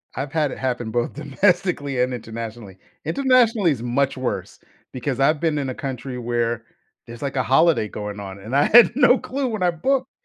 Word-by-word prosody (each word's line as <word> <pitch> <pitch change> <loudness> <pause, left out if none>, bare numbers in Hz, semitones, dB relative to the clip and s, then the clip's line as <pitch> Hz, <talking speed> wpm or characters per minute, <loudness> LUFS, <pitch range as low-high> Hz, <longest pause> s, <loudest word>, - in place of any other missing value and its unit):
I've 135 +2 -4
had 150 -4 0
it - - -7
happen 120 -3 -2
both 120 0 -1
domestically 150 -2 0
and 125 0 0
internationally. 115 -3 -7 0.3
Internationally 230 - +3
is 120 -5 -3
much 130 +3 0
worse 130 - -4 0.3
because 130 +1 -3
I've 150 +3 +3
been 160 -2 0
in 135 -2 -2
a - - -3
country 130 -1 -5
where 120 -1 -2 0.4
there's, 120 +2 -10
like, 140 0 -3
a 130 - +1
holiday 135 -1 +3
going 105 0 -6
on, 95 -1 -8
and 110 +7 -5
I 145 - +4
had 240 +1 +7
no 265 -2 +5
clue 270 0 -3
when 215 -5 -3
I 175 - +3
booked 260 - -1
135 Hz, 195 wpm, -22 LUFS, 120-170 Hz, 0.4 s, had